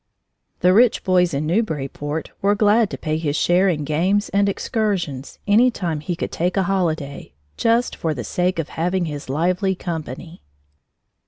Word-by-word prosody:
The 180 +1 +5
rich 235 +3 +4
boys 180 -2 +3
in 140 +2 -2
Newburyport 155 - -2
were 200 +1 +3
glad 210 +1 +3
to - - -6
pay 155 -1 -2
his 150 -3 -1
share 180 +4 +3
in 155 -4 -1
games 180 +8 +1
and 200 0 +2
excursions 190 - -2
any 220 +5 +5
time 170 -9 -3
he 170 +4 -3
could - - -4
take 180 +3 -1
a 195 - +3
holiday, 160 - -2 0.2
just 230 +1 +1
for 160 -2 -2
the 125 - -4
sake 180 +8 -1
of 165 -3 -3
having 180 +2 -1
his 145 -4 -6
lively 180 +6 +1
company. 165 -1 -6
175 Hz, 165 wpm, -21 LUFS, 155-200 Hz, 0.2 s, The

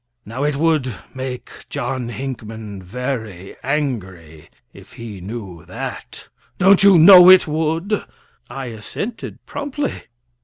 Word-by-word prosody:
Now, 115 +6 -5
it 145 -1 0
would 145 -6 0 0.2
make 130 -1 -6 0.2
John 125 -1 -3
Hinckman 110 -5 -7
very 110 -3 -5
angry 95 - -4 0.2
if - - -16
he 110 -5 -9
knew 95 -4 -8
that. - - -8 0.3
Don't 195 +1 +5
you 195 -2 +7
know 180 +2 +9
it 185 -2 +7
would?" 160 +6 -1 0.4
I 135 +2 -6
assented 120 - -7
promptly. 290 0 -4
130 Hz, 115 wpm, -19 LUFS, 110-160 Hz, 0.4 s, know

